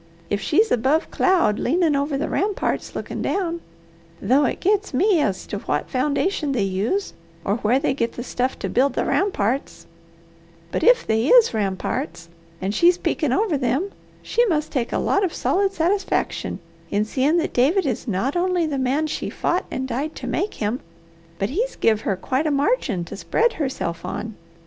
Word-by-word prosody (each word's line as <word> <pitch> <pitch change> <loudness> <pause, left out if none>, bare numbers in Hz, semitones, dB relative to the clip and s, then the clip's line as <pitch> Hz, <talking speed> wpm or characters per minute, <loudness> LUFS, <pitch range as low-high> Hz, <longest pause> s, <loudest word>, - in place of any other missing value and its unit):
If 205 0 0
she's 430 +8 +2
above 270 +8 +2
cloud 345 - +2
leanin' 320 +1 +2
over 280 0 0
the 295 - -1
ramparts 405 +1 -1
lookin' - - -4
down 340 -3 -1 0.6
though 275 +4 +3
it - - -1
gets 410 -5 +1
me 375 +4 +3
as 200 -10 -1
to 205 - -4
what 145 -6 -2
foundation 290 +3 0
they 230 -6 +1
use 200 - -1 0.3
or 200 +3 +1
where 235 +2 +2
they 275 -1 +1
get 235 -3 -1
the 240 - -6
stuff 255 +1 -2
to - - -3
build 275 +3 +2
the - - 0
ramparts 270 - -1 0.9
but - - -1
if 485 +1 +5
they 220 +3 +1
is 480 - +6
ramparts, 200 - -3 0.3
and 195 +2 -2
she's 345 +10 +4
peekin' 330 -5 -1
over 370 - +1
them, 270 +10 0 0.3
she 475 - +2
must 310 -5 0
take 250 -5 -1
a - - 0
lot 400 - +1
of 365 - -1
solid 390 +1 +1
satisfaction 385 +3 -1 0.3
in 205 +1 +1
seeing 275 +8 +1
that 335 - -1
David 315 +10 +3
is 260 -1 -2
not 230 - -1
only 355 -1 +1
the 290 -3 -2
man 265 +4 +1
she 310 - -3
fought 355 - -1
and 260 0 -3
died 275 +6 -3
to - - -7
make 415 - -2
him, 220 +4 -2 0.6
but 195 +6 -1
he's 470 - -1
give 220 -1 +2
her 200 - 0
quite 260 +10 -1
a - - +2
margin 280 - 0
to - - -8
spread 465 - +1
herself 260 - -3
on. 220 +1 -4
280 Hz, 180 wpm, -22 LUFS, 235-360 Hz, 0.9 s, is